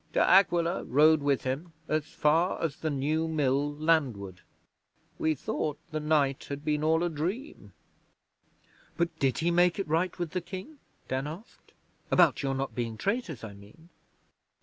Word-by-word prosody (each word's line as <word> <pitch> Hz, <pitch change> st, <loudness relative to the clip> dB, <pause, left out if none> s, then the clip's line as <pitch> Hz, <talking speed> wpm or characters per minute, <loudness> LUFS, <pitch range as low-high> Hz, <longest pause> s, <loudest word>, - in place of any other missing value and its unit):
De -, -, +2 dB
Aquila 175 Hz, -2 st, +4 dB
rode 150 Hz, +4 st, +5 dB
with 140 Hz, -2 st, +1 dB
him 145 Hz, +6 st, -4 dB
as 155 Hz, 0 st, -1 dB
far 165 Hz, +5 st, +1 dB
as 165 Hz, -4 st, -2 dB
the 160 Hz, -, -2 dB
New 150 Hz, +3 st, 0 dB
Mill 145 Hz, -2 st, +1 dB
landward. 130 Hz, -, 0 dB, 0.8 s
We 155 Hz, 0 st, +1 dB
thought 150 Hz, +2 st, -3 dB
the 155 Hz, -, -2 dB
night 150 Hz, -3 st, +1 dB
had 140 Hz, +1 st, -7 dB
been 150 Hz, 0 st, 0 dB
all 160 Hz, +2 st, +3 dB
a -, -, +2 dB
dream.' 180 Hz, -, -5 dB, 1.3 s
'But 170 Hz, -1 st, 0 dB
did 135 Hz, -2 st, +1 dB
he 170 Hz, +1 st, +1 dB
make 175 Hz, 0 st, +3 dB
it 195 Hz, -, -2 dB
right 165 Hz, +3 st, 0 dB
with 175 Hz, -3 st, -3 dB
the 180 Hz, -, -2 dB
King?' 195 Hz, -, -9 dB, 0.3 s
Dan 130 Hz, +2 st, -2 dB
asked. 170 Hz, +9 st, -11 dB, 0.4 s
'About -, -, +4 dB
your 135 Hz, -1 st, -1 dB
not 135 Hz, 0 st, -3 dB
being 115 Hz, -3 st, -3 dB
traitors, 200 Hz, -, -2 dB
I 105 Hz, -2 st, -7 dB
mean.' 105 Hz, +12 st, -17 dB
155 Hz, 160 wpm, -29 LUFS, 140-170 Hz, 1.3 s, rode